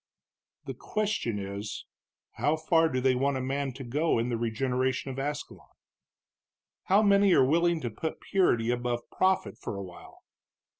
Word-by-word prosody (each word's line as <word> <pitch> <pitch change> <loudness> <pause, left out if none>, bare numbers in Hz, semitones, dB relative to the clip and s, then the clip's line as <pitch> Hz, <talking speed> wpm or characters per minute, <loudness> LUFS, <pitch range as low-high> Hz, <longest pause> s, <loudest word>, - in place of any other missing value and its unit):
"The - - -5
question 210 - -2
is, 100 +1 -5 0.5
how 150 - 0
far 160 +1 +3
do 130 - -1
they 130 0 +3
want 135 +2 0
a - - -2
man 135 +1 -2
to 135 +2 -8
go 145 +6 0
in 115 +2 0
the 120 - 0
regeneration 125 +2 -1
of 130 - -6
Ascalon? 145 +2 -5 1.2
How 200 +3 +4
many 200 -2 +5
are 130 - +5
willing 170 +3 +2
to 120 - -3
put 160 +9 -5
purity 120 -12 +1
above 120 -1 -3
profit 190 0 0
for - - -5
a 100 - -5
while? 90 -2 -13
135 Hz, 160 wpm, -28 LUFS, 120-160 Hz, 1.2 s, many